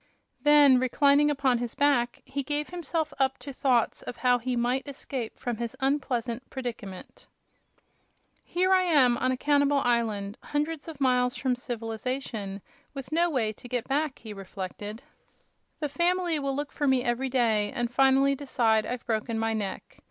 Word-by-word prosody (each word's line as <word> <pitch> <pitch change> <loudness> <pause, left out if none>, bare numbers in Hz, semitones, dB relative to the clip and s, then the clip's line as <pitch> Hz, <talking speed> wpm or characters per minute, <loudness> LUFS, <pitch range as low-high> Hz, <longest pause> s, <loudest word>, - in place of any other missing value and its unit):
Then, 290 -3 +6
reclining 280 +3 +4
upon 270 -4 +2
his 240 -1 -4
back, 270 -4 +1
he 280 - -3
gave 295 +2 -2
himself 330 -2 -3
up 270 0 +2
to 280 - -9
thoughts 255 -3 +1
of - - -7
how 250 -1 +3
he 250 +1 -2
might 245 +4 0
escape 265 -4 -5
from 240 -2 -3
his 235 0 -5
unpleasant 260 -3 -1
predicament. 230 -8 -7 1.2
"Here 370 +2 +1
I 375 - +5
am, 285 -9 +4
on 255 - +1
a 255 - -1
cannibal 285 0 +3
island, 230 -4 0
hundreds 300 +1 -3
of 315 -4 -8
miles 250 -2 +2
from 255 -2 0
civilization, 225 -3 -4 0.3
with 275 +1 -7
no 340 +2 +2
way 230 -8 0
to 245 - -12
get 245 -2 -2
back," 290 +1 0
he 220 -2 -9
reflected. 195 +3 -7 0.8
"The 300 - 0
family 345 +1 +1
will 275 -1 -2
look 290 +1 -3
for 290 - -1
me 260 -2 +3
every 250 +2 -1
day, 225 -5 +2
and 240 0 -2
finally 270 +1 +4
decide 235 -6 +1
I've 250 -1 -4
broken 225 0 -1
my 225 0 0
neck. 205 -3 -5
255 Hz, 165 wpm, -27 LUFS, 235-285 Hz, 1.2 s, Then